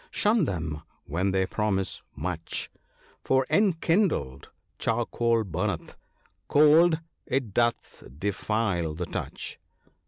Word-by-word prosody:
Shun 210 -3 +2
them 80 - -3 0.2
when 90 +6 0
they 95 0 +2
pro 105 +3 -1
mise 95 -3 -1
much! - - -3 0.5
For, 130 0 +2
enkindled, 165 - +1 0.3
charcoal 115 -1 +1
burneth 90 -1 -3 0.3
— - - -37
cold, 160 +3 +6 0.3
it 125 -6 -1
doth 120 +1 0
defile 100 -3 -1
the 90 +2 -3
touch." - - -5
105 Hz, 105 wpm, -27 LUFS, 90-145 Hz, 0.5 s, cold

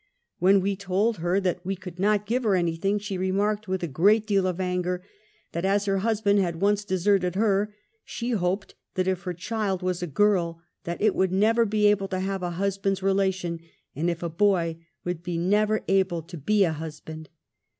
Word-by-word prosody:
When 190 +2 +5
we 200 +1 0
told 200 +3 0
her 175 +3 +1
that 180 -1 -1
we 195 +2 -2
could 180 -2 -10
3 - - -6
34 - - +4
UN3IASKED. - - +1
not - - -26
give 245 +4 0
her 210 -4 +3
anything, 175 +3 0
she 205 -2 -4
remarked 205 +3 0
with 185 -1 -2
a - - 0
great 205 +10 +3
deal 200 -3 +2
of 180 -1 -2
anger, 180 -1 -1 0.5
that 170 - -3
as 200 +1 +2
her 195 -1 +1
luisband 205 -1 +2
had 170 -3 -1
once 205 +1 +2
deserted 185 -1 +1
her, 205 0 +1 0.3
she 240 +1 -4
hoped 195 -2 -1 0.2
that 185 0 0
if 185 -1 0
her 180 - -2
child 195 0 -2
was 180 -1 -1
a 175 - -2
girJ 170 0 +2 0.3
that 170 +3 -4
"it 215 -3 +4
would 190 -1 +1
never 225 +5 +3
be 210 0 +1
able 205 -1 +3
to 185 -1 -3
have 195 0 -2
a 180 - -2
husband's 195 +1 -1
relation, 190 -3 0 0.4
and 165 +5 0
if 170 0 -3
a - - 0
boy 170 -2 +1 0.2
that 175 - -1
it 165 - -25
w^ould 175 -1 -3
never 210 +4 +2
be - - -2
able 175 -4 -1
to 175 +3 -10
be 200 +7 +2
a 165 -4 +1
husband.' 155 0 -8
190 Hz, 215 wpm, -26 LUFS, 175-205 Hz, 0.5 s, When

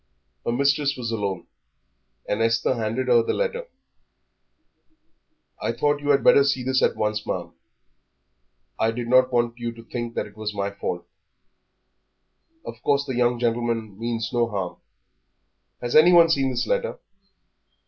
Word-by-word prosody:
Her - - -1
mistress 140 +3 +1
was 115 -2 -4
alone, 100 -5 -3 0.8
and 105 - -1
Esther 115 +2 +2
handed 115 +2 -2
her 120 -2 +5
the - - -1
letter. - - -2 1.9
"I - - -1
thought 145 0 +1
you 145 - -3
had 140 -1 +4
better 140 - +6
see 135 -2 0
this 130 +1 +1
at - - +2
once, 105 0 -2
ma'am. - - -4 1.3
I 110 - +2
did 115 +1 -4
not 130 +1 +4
want 120 -1 0
you 120 0 -3
to 115 0 -13
think 120 0 -6
it - - -4
was 110 -1 -5
my 100 0 -2
fault. 90 -3 -4 1.6
Of - - -8
course 140 0 +1
the 130 - -4
young 120 0 +2
gentleman 115 -3 -2
means 115 -1 -3
no 120 -1 +2
harm." 95 -4 -4 1.0
"Has 120 0 -3
anyone 170 +1 +7
seen 135 -4 +2
this 130 - -1
letter?" - - -1
120 Hz, 150 wpm, -24 LUFS, 115-140 Hz, 1.9 s, anyone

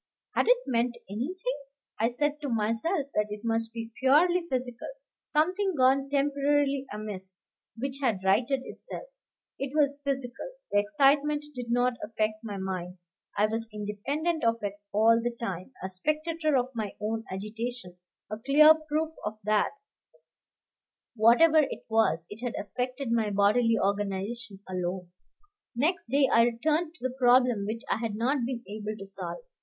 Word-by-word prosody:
Had - - +2
it - - +6
meant 240 0 0
anything? 360 - -3 0.4
I 225 - +3
said 295 +5 -1
to 285 - -3
myself 230 - 0
that 210 0 +1
it 210 0 -6
must 225 -1 0
be 230 0 -6
purely 340 +6 +4
physical, 250 -2 -3 0.4
something 365 +5 +1
gone 270 +1 +3
temporarily 280 -1 +1
amiss, 190 -4 -6 0.3
which 270 +3 -4
had 225 -8 +1
righted 240 +8 +2
itself. - - -8 0.5
It 275 +1 -4
was 285 -1 +2
physical; 270 - -3 0.2
the 205 - +4
excitement 290 +5 +3
did 245 -3 -6
not 245 0 +2
affect 215 0 -2
my 205 -3 -5
mind. 185 -1 -4 0.4
I 205 - +5
was 225 +1 -3
independent 260 +11 -2
of 230 0 +3
it 200 -1 -1 0.2
all 225 +2 +4
the 240 0 -2
time, 190 -1 -4
a - - -1
spectator 305 - 0
of 255 +1 -1
my 215 -4 -4
own 220 +2 -2
agitation, 210 -1 -5 0.3
a 215 - -4
clear 300 +6 +7
proof 310 0 -2 0.3
that, 210 0 +2 1.4
whatever 245 +9 +6
it 285 -3 -1
was, 170 -8 +2
it 220 +4 -9
had 245 - -2
affected 250 +4 -3
my 225 -2 +2
bodily 210 +4 +3
organization 200 +2 -2
alone. 180 -1 -3 0.6
Next 315 +8 0
day 275 +1 +4
I 230 - +7
returned 310 +8 0
to 360 - -17
the 255 - -8
problem 245 -4 +4
which 225 +2 -4
I - - +1
had 225 -2 -3
not 255 +6 +1
been 245 -2 -4
able 215 +1 -5
to 195 - -8
solve. 195 - -7
240 Hz, 150 wpm, -28 LUFS, 210-285 Hz, 1.4 s, clear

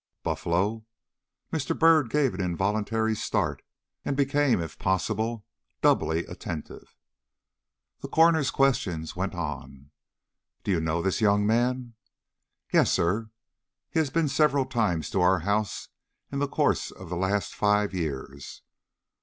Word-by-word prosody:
Buffalo! 100 +6 -1 0.7
Mr. 155 -4 -1
Byrd 160 -6 +5
gave 140 -3 +2
an 95 - -4
involuntary 105 +5 0
start, - - -1 0.4
and 140 - -2
became, 140 -4 +2
if 80 -1 -6
possible, 110 +4 -1 0.4
doubly 80 +2 +2
attentive. 85 -3 -8 1.0
The - - -6
coroner's 160 -3 +4
questions 90 - 0
went 95 +1 -3
on. 75 -4 -6 0.7
"Do - - -1
you 90 - +2
know 80 +1 -1
this 95 +2 0
young 105 -1 +3
man?" 120 +2 +1 0.8
"Yes, - - +4
sir. 100 +6 0 0.6
He 160 - +1
has 155 -3 +1
been 165 +2 +1
several 145 -2 +2
times 105 - 0
to 95 - +1
our 90 -1 +4
house 100 +2 -1 0.4
in 140 - -2
the 145 - +1
course - - +1
of 90 -2 -11
the 90 - -3
last 95 +3 -1
five 105 -1 +2
years." 70 -5 -5
105 Hz, 130 wpm, -27 LUFS, 90-130 Hz, 1.0 s, Byrd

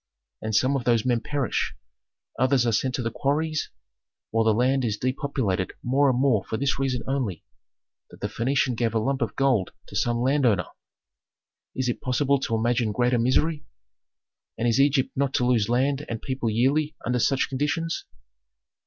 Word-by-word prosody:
And 110 -1 -2
some 130 +5 +3
of 135 - -1
those 120 -1 +2
men 120 -2 +2
perish, 140 - -2 0.6
others 130 -1 +3
are 115 - +2
sent 125 +4 0
to 125 - -2
the 115 - -2
quarries, 155 +4 -1 0.6
while 115 0 +2
the 110 -1 +3
country 130 0 +2
is 105 - -2
depopulated 130 -7 -1
more 135 +3 +3
and 125 - +1
more 130 -8 +3
for 110 - -3
this 140 +2 0
reason 130 -3 -1
only, 130 -10 -2 0.6
that - - -15
the - - -4
Phœnician 130 +1 0
gave 115 -1 -1
a - - +3
lump 135 +4 -1
of - - -2
gold 130 -9 +1 0.2
to - - -10
some 120 0 +1
landowner! 125 - +2 1.1
Is 130 -1 -1
it 120 - -2
possible 140 +2 +1
to 130 -4 -1
imagine 115 0 +1
greater 125 +2 +1
misery? 145 +6 +1 0.9
And 120 - 0
is 115 +2 +2
Egypt 140 -1 +3
not 140 0 0
to 125 - +2
lose 115 -4 +2
land 135 +4 +1
and 115 - -3
people 130 -2 -2
yearly 140 +7 +1
under 125 +1 0
such 135 +3 +2
conditions? 150 +5 -2
130 Hz, 175 wpm, -25 LUFS, 115-140 Hz, 1.1 s, some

